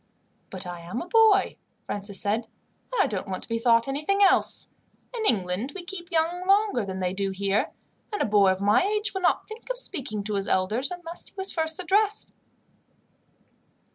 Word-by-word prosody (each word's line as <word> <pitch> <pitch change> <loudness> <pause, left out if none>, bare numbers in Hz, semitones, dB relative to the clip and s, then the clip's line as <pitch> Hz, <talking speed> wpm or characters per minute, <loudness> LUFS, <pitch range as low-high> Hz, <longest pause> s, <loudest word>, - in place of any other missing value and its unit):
"But 190 0 -5
I 175 -1 -6
am 175 +7 -5
a 345 - -6
boy," 435 0 +4 0.3
Francis 200 -1 -3
said, 215 +3 0
"and 430 - -4
I - - +1
don't 200 -2 -3
want 185 -1 -4
to - - -9
be 230 0 -1
thought 230 0 +3
anything 305 +9 +1
else. 390 - +3 0.5
In 445 -2 -1
England 200 +4 0
we 375 - -6
keep 350 -1 -7
young 340 +1 0
longer 400 - +3
than 190 -1 -5
they 180 0 -1
do 195 0 -1
here, 195 +2 0 0.4
and 415 - -3
a - - +2
boy 200 -2 +4
of 185 +1 -3
my 205 +1 +4
age 420 +2 0
would 380 - -3
not 360 - +1
think 450 +3 -10
of - - -2
speaking 255 - -2
to 210 +1 -3
his 195 -1 -1
elders, 210 - +1
unless 350 -1 -6
he - - -30
was 385 0 0
first 320 0 +1
addressed. 410 +4 +1
260 Hz, 195 wpm, -26 LUFS, -, 0.5 s, boy